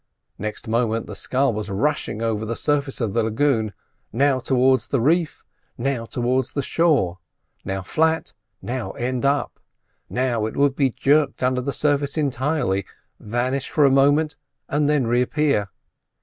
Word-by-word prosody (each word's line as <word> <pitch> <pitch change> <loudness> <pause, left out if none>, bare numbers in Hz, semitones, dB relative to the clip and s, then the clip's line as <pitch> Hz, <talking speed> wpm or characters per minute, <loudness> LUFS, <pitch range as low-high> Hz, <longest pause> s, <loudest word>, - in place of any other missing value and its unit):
Next 105 +3 -5
moment 115 0 0
the 105 - -8
scull 130 +2 0
was 105 0 -4
rushing 110 0 -1
over 110 -1 -1
the 115 +1 -3
surface 145 -1 -1
of 110 -4 -1
the 115 - +2
lagoon, 110 0 +1 0.4
now 135 +2 +2
towards 130 -2 +2
the 135 - 0
reef, 160 +6 +1 0.3
now 120 -2 -2
towards 125 +2 -1
the 140 - -1
shore, 135 - +1 0.4
now 95 0 -3
flat, 160 +9 0 0.3
now 125 0 -4
end 125 +2 -2
up. 140 +1 0 0.5
Now 120 -4 0
it - - -7
would 140 -1 +3
be 135 -2 +2
jerked 145 +3 +1
under 125 0 +1
the 140 - -2
surface 145 0 0
entirely; 135 -8 0 0.4
vanish 125 +5 -2
for 150 - +3
a 135 - +5
moment, 145 +3 +3 0.3
and 145 0 +1
then 150 -4 +2
reappear. 125 -2 +1
130 Hz, 150 wpm, -22 LUFS, 115-145 Hz, 0.5 s, a